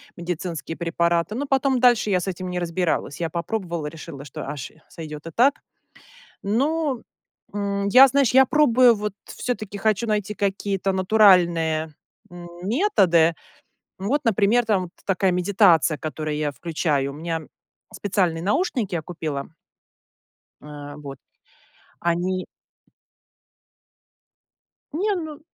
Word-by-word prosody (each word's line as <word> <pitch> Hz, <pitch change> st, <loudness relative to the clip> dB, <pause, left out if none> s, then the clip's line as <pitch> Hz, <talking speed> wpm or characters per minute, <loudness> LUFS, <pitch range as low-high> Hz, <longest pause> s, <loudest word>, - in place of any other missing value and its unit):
медицинские 170 Hz, -2 st, -5 dB
препараты. 170 Hz, +3 st, 0 dB
Но 280 Hz, +4 st, -2 dB
потом 270 Hz, -1 st, +1 dB
дальше 240 Hz, -4 st, +4 dB
я 185 Hz, -2 st, +2 dB
с -, -, -5 dB
этим 185 Hz, -1 st, -4 dB
не 180 Hz, -, -3 dB
разбиралась. 170 Hz, -4 st, -2 dB
Я 165 Hz, -1 st, -1 dB
попробовала, 170 Hz, -2 st, -3 dB
решила, 150 Hz, -2 st, -9 dB
что, 140 Hz, -2 st, -8 dB
аж, 140 Hz, -3 st, -6 dB, 0.2 s
сойдет 155 Hz, -1 st, -9 dB
и -, -, -7 dB
так. 270 Hz, -, +4 dB, 0.9 s
Но, 275 Hz, +5 st, 0 dB, 0.5 s
м, 200 Hz, -1 st, -2 dB
я, 255 Hz, +6 st, +8 dB
знаешь, 275 Hz, -3 st, +2 dB
я 265 Hz, +1 st, +6 dB
пробую, 255 Hz, -4 st, +5 dB
вот 210 Hz, -1 st, -3 dB
всё-таки 215 Hz, -5 st, -4 dB
хочу 215 Hz, +2 st, +1 dB
найти 210 Hz, -1 st, -1 dB
какие-то 195 Hz, -1 st, -1 dB
натуральные, 175 Hz, -6 st, +3 dB, 0.4 s
м, 175 Hz, 0 st, -10 dB
методы. 190 Hz, -, +3 dB, 0.7 s
Вот, 245 Hz, +10 st, 0 dB
например, 225 Hz, +1 st, +3 dB
там 190 Hz, -5 st, 0 dB, 0.2 s
такая 190 Hz, -1 st, +1 dB
медитация, 180 Hz, -4 st, +3 dB
которую 155 Hz, +1 st, -4 dB
я 150 Hz, -1 st, -1 dB
включаю. 145 Hz, -2 st, -1 dB
У -, -, -10 dB
меня 165 Hz, +1 st, -3 dB, 0.5 s
специальные 180 Hz, -5 st, 0 dB
наушники 215 Hz, -, 0 dB
я 165 Hz, -, -1 dB
купила. 155 Hz, -4 st, -5 dB, 1.1 s
Э, 145 Hz, -1 st, -9 dB
вот 140 Hz, -2 st, -9 dB, 0.8 s
они 180 Hz, +2 st, -1 dB, 2.5 s
Не, 400 Hz, +6 st, 0 dB
ну, 315 Hz, -4 st, -6 dB
185 Hz, 120 wpm, -23 LUFS, 165-220 Hz, 2.5 s, я